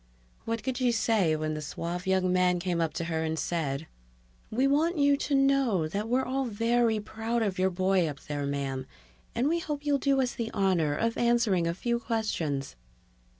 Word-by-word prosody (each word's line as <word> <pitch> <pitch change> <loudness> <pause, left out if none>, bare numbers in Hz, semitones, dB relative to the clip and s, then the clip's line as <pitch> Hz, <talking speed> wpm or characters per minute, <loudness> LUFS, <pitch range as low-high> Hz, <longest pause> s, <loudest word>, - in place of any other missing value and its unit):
What 230 -1 -2
could 260 -1 -2
she 250 -2 +2
say 220 -8 +2
when 155 0 -2
the 155 - -4
suave 170 +5 -5
young 185 -1 +2
man 180 -1 +3
came 175 -1 -1
up 165 -2 0
to - - -2
her 160 -1 -1
and 160 0 -2
said, 155 -4 -2 0.6
"We 255 +5 +1
want 315 +5 +2
you 285 -1 +4
to 285 0 -1
know 270 - +3
that 205 +7 -3
we're 255 +2 +2
all 265 +1 -1
very 230 0 +1
proud 225 +2 -2
of 195 -3 -2
your 190 0 +3
boy 185 -1 +2
up 145 -2 -5
there, 145 -1 -3
ma'am, 135 -2 -3 0.5
and 240 +4 +1
we 335 +3 +1
hope 295 -3 -4
you'll 285 -1 +2
do 275 0 +2
us 255 -2 +1
the 230 -1 -3
honor 175 -7 +2
of 230 +7 -1
answering 235 -8 +2
a 170 - -1
few 235 +4 -1
questions." 175 - -2
205 Hz, 195 wpm, -28 LUFS, 165-240 Hz, 0.6 s, you